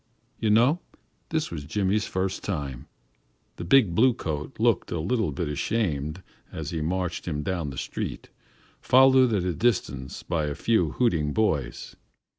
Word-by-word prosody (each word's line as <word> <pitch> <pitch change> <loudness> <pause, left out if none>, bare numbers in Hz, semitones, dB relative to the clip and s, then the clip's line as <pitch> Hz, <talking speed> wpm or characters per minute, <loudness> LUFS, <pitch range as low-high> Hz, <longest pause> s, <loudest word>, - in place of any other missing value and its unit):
You 110 - +1
know 120 +10 +4 0.5
this 160 -1 -1
was 80 -4 -5
Jimmy's 100 +6 0
first 95 0 -2
time. 70 -10 -4 0.7
The - - -5
big 100 0 +4
blue 120 +6 +4
coat 75 -1 -4
looked - - +2
a 85 - -1
little 100 +1 0
bit 80 +4 -3
ashamed 80 -1 -2 0.3
as 80 -2 -5
he 80 -2 -2
marched 90 +2 -2
him 75 -3 -2
down 85 -3 -2
the 65 - -8
street, - - -5 0.5
followed 130 -1 +6
at 100 -5 +1
a 90 -1 -1
distance 70 - -1
by 80 -3 -1
a 75 -1 -3
few 90 -10 +1
hooting 80 -12 +1
boys. 75 - -1
90 Hz, 155 wpm, -26 LUFS, 75-110 Hz, 0.7 s, followed